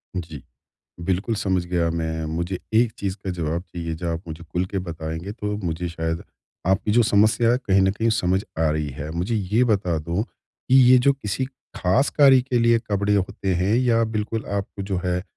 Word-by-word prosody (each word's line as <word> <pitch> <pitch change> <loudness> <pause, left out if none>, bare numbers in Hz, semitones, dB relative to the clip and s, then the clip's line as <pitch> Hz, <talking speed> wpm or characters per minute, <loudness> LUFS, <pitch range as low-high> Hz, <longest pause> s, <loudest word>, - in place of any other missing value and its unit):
जी। 80 -6 -5 0.6
बिल्कुल 95 +6 -1
समझ 95 -4 0
गया 85 -1 +1
मैं, 80 -1 -2
मुझे 85 +4 -3 0.2
एक 115 -1 +4
चीज़ 95 -1 -2
का 95 - -2
जवाब 85 -1 -2
चाहिए 85 -3 -5
जो 85 +1 -3
आप 80 - -4
मुझे 80 +1 -7
खुल 90 +2 -2
के 95 +1 -3
बताएँगे 80 +1 -5
तो 105 -2 -3
मुझे 85 +1 -2
शायद 80 0 -3 0.4
आपकी 95 +3 +1
जो 120 - +5
समस्या 110 +2 +3
है 125 - +3
कहीं 95 -6 +2
न 95 - +3
कहीं 115 +2 0
समझ 95 +2 +1 0.2
आ 80 -1 +3
रही 75 -1 -1
है। 75 +2 -5
मुझे 90 +8 -2
ये 105 +3 +1
बता 95 -8 +1
दो 85 +6 -2
कि 125 +2 -5 0.2
ये 130 - +8
जो 140 - +7
किसी 130 -1 -3 0.3
खास 95 +10 +2
कार्य 135 -3 +6
के 125 -1 -1
लिए 115 0 +4
कपड़े 100 0 +1
होते 95 -1 -1
हैं 95 +5 +1
या 120 -2 +3
बिल्कुल 110 0 -3
आपको 100 0 -4
जो 95 -1 -2
है 90 0 0
95 Hz, 200 wpm, -23 LUFS, 85-110 Hz, 0.6 s, ये